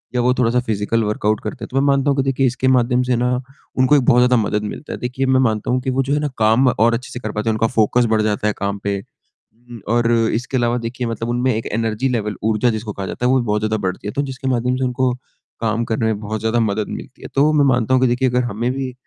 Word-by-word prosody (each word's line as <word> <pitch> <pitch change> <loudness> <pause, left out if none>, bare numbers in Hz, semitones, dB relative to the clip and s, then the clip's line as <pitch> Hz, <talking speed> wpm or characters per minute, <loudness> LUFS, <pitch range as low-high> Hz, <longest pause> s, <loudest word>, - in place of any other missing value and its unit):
या 125 - +2
वो 125 +1 +3
थोड़ा-सा 125 -1 +1
फिजिकल 110 -1 -1
वर्कआउट 105 0 0
करते 105 - -6
हैं, - - -5
तो 130 - -2
मैं 135 - +3
मानता 140 0 +2
हूँ, 135 -1 +1
देखिए 135 0 +1
इसके 130 +1 -1
माध्यम 125 -1 +3
से 125 0 +1
ना, 125 +1 0 0.5
उनको 130 +3 +4
एक 140 - +4
बहुत 120 - +5
ज़्यादा 125 0 +4
मदद 105 0 -1
मिलता 105 +8 -6
है। - - -6
देखिए 125 +2 -2
मैं 130 0 +3
मानता 110 -4 0
हूँ 130 +1 +1
कि 130 - -3
वो 130 +1 +1
जो 135 +2 -1
है 150 - +2
ना 150 - -1
काम 115 +4 +3
और 115 -1 +2
अच्छे 120 +2 -4
से 125 - -6
कर 110 -3 -5
पाते 105 +1 -2
हैं, - - +2
उनका 110 +1 +1
फोकस 120 +2 +3
बढ़ 110 -1 +3
जाता 105 0 0
है 105 - +1
काम 100 0 -2
पे 100 0 -1 0.6
उम, 120 0 -13
और 120 +1 +2
इसके 115 +2 0
अलावा 120 0 +1
देखिए 120 +1 -4
मतलब 115 0 -4
उनमें 125 +1 +1
एक 110 - -3
एनर्जी 115 +3 -1
लेवल 105 -5 -2
ऊर्जा 110 +2 +2
जिसको 110 -2 -3
कहा 95 - -5
जाता 125 - -4
है 125 - +4
वो 130 - +4
भी 120 - -2
बहुत 105 -1 0
ज़्यादा 110 0 0
बढ़ती 95 +2 -4
है, - - -2
तो 140 - 0
जिसके 135 -1 -5
माध्यम 125 0 +1
से 130 - -2
उनको 125 0 0 0.5
काम 115 +1 0
करने 110 0 -1
में 110 -2 0
बहुत 110 +1 -4
ज़्यादा 110 +2 0
मदद 110 -2 0
मिलती - - -8
है। - - -7
तो 145 +3 +4
मैं 145 -2 +4
मानता 125 -2 +2
हूँ 130 - +4
कि 130 - +4
देखिए 125 +2 +1
अगर 125 0 +1
हमें 120 +1 -2
भी 130 -1 -4
120 Hz, 280 wpm, -19 LUFS, 110-130 Hz, 0.6 s, बहुत